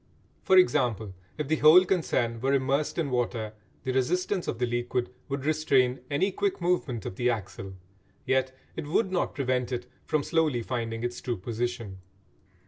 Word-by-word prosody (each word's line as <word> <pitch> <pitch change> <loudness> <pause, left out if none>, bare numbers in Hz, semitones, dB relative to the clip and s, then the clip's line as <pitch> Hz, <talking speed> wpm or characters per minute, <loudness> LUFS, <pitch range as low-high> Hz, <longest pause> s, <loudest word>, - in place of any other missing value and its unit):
For 190 - +4
example, 115 - +3 0.2
if 150 -2 -3
the 160 +2 +1
whole 160 +6 +8
concern 125 -11 0
were 135 +2 +2
immersed 140 +2 0
in 155 -5 -1
water 115 -3 -1 0.3
the 130 - -1
resistance 180 +8 0
of - - -2
the 125 - +1
liquid 120 +1 -2 0.2
would 140 0 -3
restrain 135 -5 +2
any 180 +8 +1
quick 400 - -1
movement 170 - 0
of 95 - -5
the 125 0 +2
axle, 95 -3 -4 0.5
yet 130 0 +1 0.2
it 160 -3 -5
would 190 +5 +1
not 180 - -1
prevent 130 -2 0
it 125 -1 -3 0.2
from 150 -2 +1
slowly 155 -8 +1
finding 115 -2 -3
its 120 0 -3
true 120 -3 -2
position. 115 -1 -4
130 Hz, 165 wpm, -28 LUFS, 120-155 Hz, 0.5 s, whole